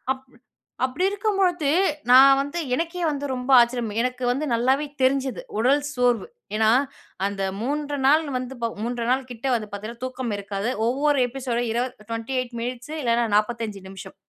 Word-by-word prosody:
அப்டி 260 -1 -20 0.5
அப்டி 275 +9 -2
இருக்கும் 405 0 -1
பொழுது 350 -6 +2 0.4
நான் 270 +1 +8
வந்து 285 +5 -5 0.2
எனக்கே 340 +3 -3
வந்து 285 -1 -3
ரொம்ப 250 +1 -4
ஆச்சரியம். 235 -2 +1
எனக்கு 250 0 -2
வந்து 275 +5 -2
நல்லாவே 265 +5 +2 0.2
தெரிஞ்சிது. 265 -4 +1 0.2
உடல் 275 +5 +3
சோர்வு. 245 - +1 0.3
ஏனா, 220 0 +4 0.6
அந்த 200 -1 -3 0.2
3 290 +2 -2
நாள் 310 +3 +5
வந்து 255 +1 -6
ப 230 - 0
3 240 -1 -2
நாள் 260 0 -1
கிட்ட 235 +2 -14
வந்து 215 -2 -5
பார்த்தீங்கன்னா 225 +5 -6
தூக்கம் 255 -4 -4
இருக்காது. 200 +3 -3 0.2
ஒவ்வொரு 280 +2 +2
எபிசோடு 245 -2 -2
இரு 240 +2 +1 0.3
28 240 +1 -3
மினிட்ஸ்சு 250 +4 -5
இல்லனா 235 -1 +2
45 215 -2 -1
நிமிஷம். 190 -1 -10
255 Hz, 155 wpm, -24 LUFS, 235-275 Hz, 0.6 s, நான்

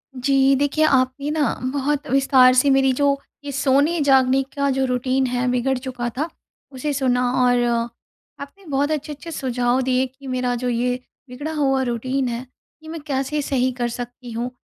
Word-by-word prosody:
जी, 270 +1 +3
देखिए 285 +3 +1
आपने 265 0 +1
ना 305 -2 +1 0.2
बहुत 285 +1 -1
विस्तार 270 -2 +5
से 255 +3 +4
मेरी 270 -1 +4
जो 280 +1 +2 0.3
ये 285 - -5
सोने-जागने 270 -1 +3
का 280 0 +1
जो 265 0 +1
रूटीन 255 +1 0
है 250 0 -1
बिगड़ 250 +2 0
चुका 250 -2 -4
था 310 +4 -1 0.4
उसे 280 +3 -3
सुना 255 -2 +1 0.2
और 245 -1 +3 0.8
आपने 285 +8 -11
बहुत 285 +2 0
अच्छे-अच्छे 300 +2 -5
सुझाव 250 -3 0
दिए 255 0 +1
कि 265 +2 -14
मेरा 250 -1 -1
जो 250 - 0
ये 245 +1 0 0.3
बिगड़ा 290 +6 -5
हुआ 270 -3 +1
रूटीन 255 +2 -1
है 235 +2 -4 0.4
ये 315 - -10
मैं 325 -1 -6
कैसे 275 +2 -1
सही 260 -2 0
कर 240 -1 -2
सकती 245 +1 -7
हूँ, 235 +2 -3
265 Hz, 170 wpm, -21 LUFS, 250-280 Hz, 0.8 s, विस्तार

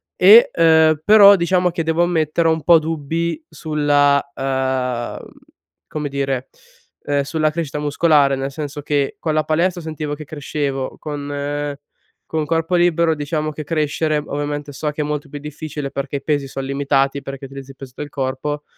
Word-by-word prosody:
e, 210 +6 +7
uhm, 160 -2 +4
però 205 -1 +8
diciamo 180 +1 +1
che 170 -1 -2
devo 160 +2 +1
ammettere, 165 -1 +1
ho - - +4
un 160 -1 -4
po' 170 +3 +7
dubbi 165 - -3
sulla, 145 -2 +2
uhm, 130 -2 -2 0.6
come 150 -1 -4
dire, 135 -2 -2 0.6
ehm, 145 -1 +1
sulla 155 +2 0
crescita 150 -2 -4
muscolare, 145 -1 +3
nel 135 +1 -4
senso 145 0 -6
che: 145 -2 0
con 155 - -1
la 155 0 +2
palestra 170 +4 0
sentivo 155 -2 -5
che 155 +1 -9
crescevo, 140 -2 -3
con 145 0 -4 0.6
con 155 -1 -1
corpo 165 +2 0
libero, 170 -2 +3
diciamo, 155 +1 -2
che 155 +1 -7
crescere 155 0 0
ovviamente, 145 0 -4
so 150 +2 -3
che 150 - -4
è - - -1
molto 150 0 -4
più 145 - -7
difficile, 150 -1 -6
perché 140 +1 -3
i 140 - -10
pesi 145 -3 0
son 135 0 -5
limitati, 140 0 0
perché 135 0 -7
utilizzi 135 0 -10
peso 130 -1 -11
del 150 - -6
corpo, 140 +2 -3
150 Hz, 165 wpm, -19 LUFS, 140-160 Hz, 0.6 s, però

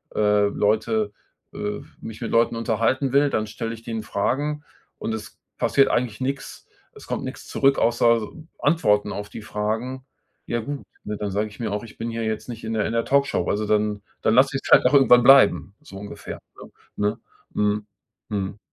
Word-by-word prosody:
äh, 105 -1 +3
Leute, 110 +1 0 0.4
äh 105 0 -3 0.2
mich 110 -1 -8
mit 115 - -3
Leuten 115 0 +3
unterhalten 115 +4 0
will, 140 +1 +4
dann 110 -4 -1
stelle 115 +1 -5
ich 115 - -11
denen 115 -2 -4
Fragen, 145 +8 -1 0.4
und 115 - -3
es 110 - -8 0.2
passiert 135 -1 +3
eigentlich 120 -4 -1
nix. 135 +1 -4 0.3
Es - - -14
kommt - - -3
nix - - -8
zurück, 135 0 +2
außer 115 -1 +3 0.3
Antworten 105 -10 +2
auf 105 0 -6
die - - -8
Fragen. 115 +6 -3 0.4
Ja 120 - -1
gut, 140 +4 -5 0.2
ne, 105 - -3
dann 100 -2 -3
sage 105 +2 0
ich 100 - -16
mir 110 - -2
auch: 105 +2 -3
„Ich 115 - -12
bin 115 +1 -4
hier 115 0 -3
jetzt 110 +3 -3
nicht 115 -1 -7
in 110 - -3
der 110 -2 0
in - - -2
der 115 0 0
Talkshow.“ 140 0 +1
Also 105 +1 0
dann 105 -1 +1 0.2
dann 110 - +2
lasse 135 +1 +4
ich's - - -7
halt - - +7
auch 130 - +4
irgendwann 125 -3 +7
bleiben, 135 -6 +6
so 125 - -13
ungefähr, 100 +1 -8 0.2
ne? - - -12 0.3
Ne? 105 0 0 0.3
Mhm. 105 0 0 0.4
Mhm. 100 -1 -3
110 Hz, 190 wpm, -23 LUFS, 105-125 Hz, 0.4 s, halt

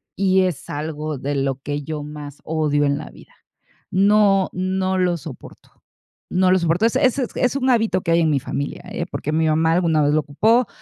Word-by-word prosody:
y 190 -1 +3
es 180 -5 -2
algo 150 0 -4
de 140 +3 -3
lo 135 -1 -1
que 145 0 -3
yo 150 0 -5
más 145 -1 -9
odio 150 -2 0
en 140 0 0
la - - -8
vida. - - -17 0.6
No, 195 0 +3
no 185 +1 -1
lo 180 -1 +1
soporto, 145 -3 -12 0.6
no 185 0 +2
lo 185 - +4
soporto. 170 +5 +1
Es 235 +3 +2
es 260 -1 +2 0.2
es 250 +1 +1
un 265 -1 0
hábito 225 -5 +1
que 165 - -2
hay 170 - +4
en 160 - +2
mi 140 - +2
familia, 140 +2 -5
¿eh?, - - -3
porque 150 - -3
mi 160 +1 +1
mamá 160 +1 +2
alguna 165 -3 +2
vez 145 +1 +2
lo 155 - +3
ocupó, 220 - +2
165 Hz, 205 wpm, -21 LUFS, 145-190 Hz, 0.6 s, lo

